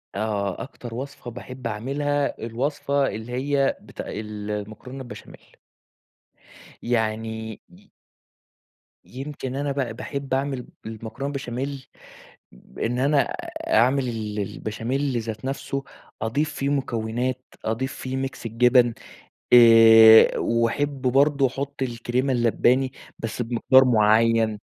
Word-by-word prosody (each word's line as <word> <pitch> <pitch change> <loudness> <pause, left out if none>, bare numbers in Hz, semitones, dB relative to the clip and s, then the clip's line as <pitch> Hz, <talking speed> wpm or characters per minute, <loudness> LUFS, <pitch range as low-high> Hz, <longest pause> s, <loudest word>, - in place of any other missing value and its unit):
آه، 100 -2 -2
أكتر 125 -3 -9
وصفة 130 -1 -7
باحب 125 +1 -7
أعملها 140 +6 -1
الوصفة 140 +3 -1
اللي 110 +3 -6
هي 135 +2 0
بت - - -9
المكرونة 105 +4 -6
البشاميل. 125 -2 -12 1.3
يعني 110 -1 -2
ي - - -20 1.2
يمكن 135 0 -6
أنا 140 +1 -1
بقي 135 -5 -2
باحب 140 +3 -5
أعمل 135 -2 -2 0.2
المكرونة 115 +6 -6
بشاميل، 135 +1 -5 0.9
إن 120 +2 -1
أنا 140 +3 +3 0.5
أعمل 130 +4 +3
ال 110 -3 -4
البشاميل 120 +6 -2
ذات 110 0 -6
نفسه، 135 0 -3 0.4
أضيف 145 +7 -1
فيه 140 - -2
مكونات، 125 -2 -2 0.2
أضيف 115 +4 -2
فيه 130 0 -5
ميكس 135 -2 -4
الجبن، 120 +1 +4 0.6
آآ 115 -2 +8
وأحب 130 +5 0
برضو 140 +2 +3
أحط 140 +2 -6
الكرِيمة 125 +2 -1
اللَّبَانِي 125 +2 +2 0.3
بس 115 +2 -4
بمقدار 125 +3 +4
مُعَيَّن. 110 -1 +3
125 Hz, 105 wpm, -24 LUFS, 115-135 Hz, 1.3 s, آآ